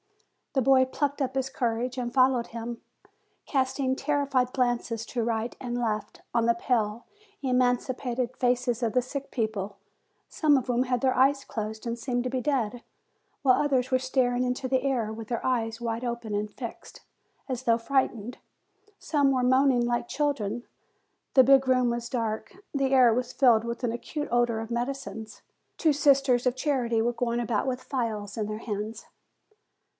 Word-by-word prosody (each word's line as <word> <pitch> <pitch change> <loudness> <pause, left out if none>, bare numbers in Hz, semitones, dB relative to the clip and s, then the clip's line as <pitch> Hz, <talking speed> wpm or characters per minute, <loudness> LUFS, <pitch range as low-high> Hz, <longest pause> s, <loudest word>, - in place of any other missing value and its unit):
The 265 -3 +2
boy 265 +1 +6
plucked 285 +2 -2
up 260 -1 -1
his 265 0 0
courage, 245 0 -2
and 240 -1 -3
followed 255 -2 +3
him, 230 0 -6 0.6
casting 265 -1 0
terrified 275 -3 0
glances 240 -3 -1
to 240 -2 -2
right 230 0 -2
and 245 -1 -3
left, 215 -3 -3
on 235 -1 +2
the 235 - +4
pale, 230 -2 -1 0.4
emaciated 250 -1 0
faces 245 -1 0
of 225 - +1
the 250 - +3
sick 275 +2 -6
people, 210 -4 -2 0.5
some 300 -3 +3
of 260 - -2
whom 245 0 +2
had 250 -1 0
their 260 -1 +3
eyes 275 +2 +3
closed, 220 +1 -5
and 235 0 -2
seemed 245 0 -1
to - - 0
be 260 -1 -1
dead, 245 -4 -1 0.6
while 255 -2 +5
others 265 -3 +1
were 255 - +3
staring 255 -1 +1
into 250 +1 -1
the 260 0 +1
air, 245 -5 -1
with 220 -1 -8
their 235 -1 -3
eyes 230 -3 0
wide 230 0 -3
open 235 -3 -3
and 210 +1 -2
fixed, 235 -1 -9 0.5
as 255 -2 -3
though 230 -2 +3
frightened. 245 -2 -1 0.6
Some 285 -3 +2
were 255 -2 +1
moaning 260 -1 +4
like 240 0 -1
children. 245 -7 -1 0.7
The 260 - +9
big 270 +1 +5
room 255 -2 +3
was 235 0 -3
dark, 225 -3 -3 0.2
the 275 -2 +1
air 255 -4 +6
was 250 +1 -1
filled 240 -5 +4
with 235 +1 -5
an 240 - +1
acute 295 +5 -4
odor 240 -2 +2
of 225 +1 -6
medicines. 240 -2 -4 0.3
Two 315 -3 +3
sisters 275 -3 +3
of 250 - +1
charity 250 -5 0
were 240 +1 +1
going 235 0 -1
about 235 +1 -1
with 255 -1 -2
phials 220 -6 -3
in 215 -2 -2
their 215 0 -4
hands. 215 0 -5
245 Hz, 170 wpm, -27 LUFS, 230-260 Hz, 0.7 s, The